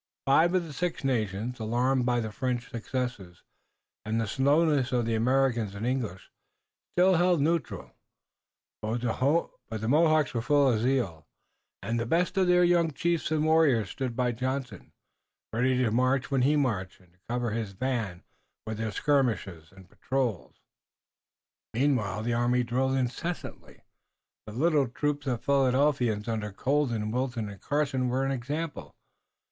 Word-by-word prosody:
Five 160 Hz, +6 st, +4 dB
of 185 Hz, -, +2 dB
the 155 Hz, -, -9 dB
Six 175 Hz, +1 st, -3 dB
Nations, 115 Hz, -2 st, -1 dB
alarmed 125 Hz, +3 st, +1 dB
by 120 Hz, -1 st, +2 dB
the 110 Hz, -1 st, -4 dB
French 125 Hz, +2 st, -3 dB
successes 115 Hz, -7 st, -5 dB, 0.6 s
and 110 Hz, +1 st, -1 dB
the 115 Hz, -, 0 dB
slowness 140 Hz, +3 st, +2 dB
of 120 Hz, -2 st, +1 dB
the 115 Hz, -, -1 dB
Americans 120 Hz, -3 st, +1 dB
and 105 Hz, +3 st, -4 dB
English, 120 Hz, -7 st, -3 dB, 0.6 s
still 180 Hz, 0 st, +5 dB
held 175 Hz, -1 st, +3 dB
neutral, 160 Hz, 0 st, -1 dB, 0.9 s
but 110 Hz, +2 st, -2 dB
the 120 Hz, -3 st, -1 dB
Mohawks 155 Hz, +1 st, +3 dB
were 115 Hz, -, -1 dB
full 140 Hz, 0 st, +3 dB
of 110 Hz, -, 0 dB
zeal, 115 Hz, -, -1 dB, 0.6 s
and 115 Hz, +1 st, -1 dB
the 115 Hz, -, -2 dB
best 175 Hz, +7 st, +1 dB
of 190 Hz, -2 st, +2 dB
their 180 Hz, 0 st, +5 dB
young 175 Hz, -1 st, +3 dB
chiefs 170 Hz, +2 st, -1 dB
and 155 Hz, -1 st, +1 dB
warriors 150 Hz, -10 st, +3 dB
stood 130 Hz, -3 st, -4 dB
by 125 Hz, 0 st, +1 dB
Johnson, 130 Hz, +2 st, -4 dB, 0.6 s
ready 125 Hz, +3 st, +2 dB
to 125 Hz, -4 st, +1 dB
march 130 Hz, +3 st, +1 dB
when 135 Hz, -2 st, +2 dB
he 145 Hz, +4 st, +3 dB
marched, 110 Hz, -10 st, -1 dB
and 90 Hz, -2 st, -25 dB
to 90 Hz, -, -33 dB
cover 120 Hz, -1 st, -1 dB
his 110 Hz, -3 st, -3 dB
van 110 Hz, -5 st, -3 dB, 0.4 s
with 110 Hz, -1 st, -5 dB
their 110 Hz, -1 st, -2 dB
skirmishers 105 Hz, -, 0 dB
and 95 Hz, -1 st, -16 dB
patrols. 125 Hz, -3 st, -3 dB, 1.2 s
Meanwhile 110 Hz, -6 st, +1 dB
the 120 Hz, +1 st, -1 dB
army 120 Hz, +1 st, +2 dB
drilled 130 Hz, +3 st, 0 dB
incessantly. 135 Hz, +7 st, -4 dB, 0.7 s
The 105 Hz, -, -7 dB
little 145 Hz, +1 st, +2 dB
troop 145 Hz, +3 st, -2 dB
of 120 Hz, -3 st, -2 dB
Philadelphians 130 Hz, -5 st, +2 dB
under 110 Hz, -2 st, -2 dB
Colden, 120 Hz, -2 st, 0 dB
Wilton 125 Hz, -3 st, -2 dB
and 100 Hz, -2 st, -11 dB
Carson 140 Hz, -3 st, 0 dB
were 130 Hz, +2 st, 0 dB
an 135 Hz, -, 0 dB
example. 145 Hz, +5 st, -4 dB
125 Hz, 150 wpm, -28 LUFS, 115-145 Hz, 1.2 s, still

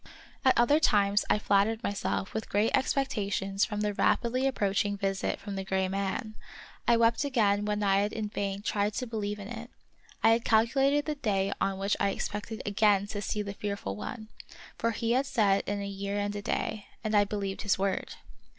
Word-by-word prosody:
At 260 Hz, -, +4 dB
other 285 Hz, +6 st, +5 dB
times 205 Hz, -7 st, +3 dB
I -, -, +4 dB
flattered 210 Hz, +2 st, +2 dB
myself 200 Hz, -1 st, -2 dB
with 220 Hz, -, -4 dB
great 210 Hz, +3 st, +2 dB
expectations 200 Hz, -7 st, 0 dB
from 210 Hz, -1 st, -4 dB
the 210 Hz, -1 st, 0 dB
rapidly 250 Hz, +5 st, +1 dB
approaching 205 Hz, -4 st, 0 dB
visit 195 Hz, -1 st, -1 dB
from 200 Hz, -1 st, -6 dB
the 195 Hz, -, -3 dB
gray 190 Hz, 0 st, 0 dB
man, 195 Hz, +3 st, -2 dB, 0.5 s
and 235 Hz, -1 st, +5 dB
wept 230 Hz, +3 st, +3 dB
again 210 Hz, -7 st, +2 dB
when 210 Hz, 0 st, -1 dB
I 195 Hz, -1 st, +3 dB
had 205 Hz, +1 st, 0 dB
in 220 Hz, -1 st, -3 dB
vain 200 Hz, -1 st, -3 dB
tried 205 Hz, 0 st, 0 dB
to 255 Hz, -, -2 dB
believe 210 Hz, -3 st, -3 dB
in 200 Hz, -1 st, -8 dB
it. 235 Hz, +1 st, -7 dB, 0.5 s
I 225 Hz, -, +7 dB
had 230 Hz, +1 st, +2 dB
calculated 270 Hz, +6 st, +3 dB
the 305 Hz, -, -1 dB
day 200 Hz, -8 st, 0 dB
on 195 Hz, -1 st, 0 dB
which 195 Hz, +1 st, 0 dB
I 200 Hz, -, +2 dB
expected 210 Hz, +2 st, -4 dB
again 205 Hz, -1 st, +3 dB
to 205 Hz, -2 st, -4 dB
see 210 Hz, +1 st, -2 dB
the 200 Hz, -1 st, -5 dB
fearful 200 Hz, -, -4 dB
one; 215 Hz, -, -7 dB, 0.5 s
for 230 Hz, -, 0 dB
he 230 Hz, 0 st, -1 dB
had 265 Hz, +3 st, +2 dB
said 205 Hz, -7 st, +3 dB
in 205 Hz, 0 st, -1 dB
a -, -, -4 dB
year 200 Hz, +1 st, -3 dB
and 205 Hz, 0 st, -2 dB
a 205 Hz, -, -3 dB
day, 215 Hz, 0 st, -2 dB, 0.2 s
and 215 Hz, -1 st, -2 dB
I 205 Hz, -1 st, +6 dB
believed 200 Hz, -1 st, -3 dB
his 205 Hz, -3 st, +1 dB
word. 195 Hz, 0 st, -2 dB
205 Hz, 195 wpm, -29 LUFS, 200-225 Hz, 0.5 s, I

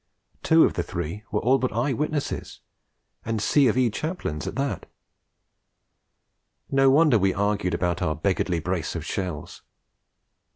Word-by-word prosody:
Two 160 Hz, 0 st, +5 dB
of -, -, +3 dB
the -, -, -1 dB
three 85 Hz, +8 st, -5 dB
were 105 Hz, -, 0 dB
all 130 Hz, +3 st, +3 dB
but 130 Hz, -, -1 dB
eye 120 Hz, +6 st, 0 dB
witnesses, 150 Hz, +2 st, -3 dB, 0.6 s
and 115 Hz, -1 st, -2 dB
C. 135 Hz, +6 st, +3 dB
of 115 Hz, -, +1 dB
E. 125 Hz, -3 st, +3 dB
chaplains 130 Hz, -, -4 dB
at -, -, -5 dB
that! 135 Hz, 0 st, -3 dB, 1.8 s
No 135 Hz, 0 st, +4 dB
wonder 140 Hz, -4 st, +5 dB
we 95 Hz, -1 st, +1 dB
argued 100 Hz, -2 st, 0 dB
about 90 Hz, 0 st, -1 dB
our 80 Hz, -4 st, 0 dB
beggarly 90 Hz, 0 st, 0 dB
brace 90 Hz, 0 st, -3 dB
of -, -, -4 dB
shells. 90 Hz, -6 st, -5 dB
105 Hz, 150 wpm, -25 LUFS, 90-135 Hz, 1.8 s, Two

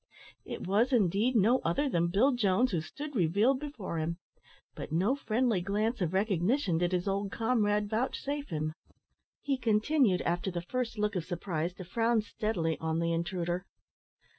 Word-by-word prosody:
It -, -, -6 dB
was, 210 Hz, +8 st, +2 dB
indeed, 220 Hz, +2 st, +2 dB
no 230 Hz, +5 st, +4 dB
other 175 Hz, -, 0 dB
than 170 Hz, -9 st, +1 dB
Bill 210 Hz, +11 st, +3 dB
Jones 240 Hz, 0 st, +2 dB
who 170 Hz, -4 st, 0 dB
stood 290 Hz, -, -8 dB
revealed 205 Hz, +8 st, +3 dB
before 245 Hz, -, -5 dB
him; 165 Hz, +2 st, -2 dB, 0.6 s
but -, -, -7 dB
no 190 Hz, -, +2 dB
friendly 235 Hz, -6 st, 0 dB
glance 210 Hz, +5 st, -1 dB
of 170 Hz, -3 st, 0 dB
recognition 190 Hz, -, +1 dB
did 175 Hz, 0 st, +1 dB
his 180 Hz, +1 st, -1 dB
old 200 Hz, 0 st, -1 dB
comrade 210 Hz, -3 st, +1 dB
vouchsafe 275 Hz, +6 st, -2 dB
him. 155 Hz, -2 st, -2 dB, 0.7 s
He 275 Hz, -2 st, 0 dB
continued, 225 Hz, -2 st, +2 dB
after 175 Hz, +3 st, -1 dB
the 175 Hz, -2 st, -4 dB
first 240 Hz, +3 st, -3 dB
look 210 Hz, -1 st, 0 dB
of 175 Hz, -3 st, -2 dB
surprise, 175 Hz, -1 st, -3 dB
to 185 Hz, -, -8 dB
frown 230 Hz, +4 st, +1 dB
steadily 180 Hz, -8 st, -2 dB
on 160 Hz, 0 st, -1 dB
the 170 Hz, 0 st, 0 dB
intruder. 175 Hz, +1 st, -2 dB
200 Hz, 165 wpm, -30 LUFS, 175-240 Hz, 0.7 s, no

